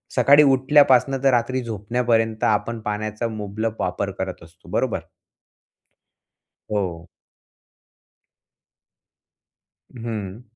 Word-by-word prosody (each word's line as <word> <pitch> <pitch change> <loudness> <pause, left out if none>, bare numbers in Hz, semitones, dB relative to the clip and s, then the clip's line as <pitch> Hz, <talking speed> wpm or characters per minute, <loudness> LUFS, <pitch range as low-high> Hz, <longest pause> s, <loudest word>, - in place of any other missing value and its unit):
सकाळी 145 +2 +6
उठल्यापासनं 135 -1 +4
तर 135 - +5
रात्री 125 +2 0
झोपण्यापर्यंत 115 0 -1
आपण 110 +2 0
पाण्याचा 110 +2 -3
मुबलक 110 0 -4
वापर 90 +2 -2
करत 95 -3 -5
असतो, 80 - -18
बरोबर? - - -1 1.7
हो. 90 -5 -3 2.8
हं. 110 -4 -6
110 Hz, 80 wpm, -22 LUFS, 105-125 Hz, 2.8 s, सकाळी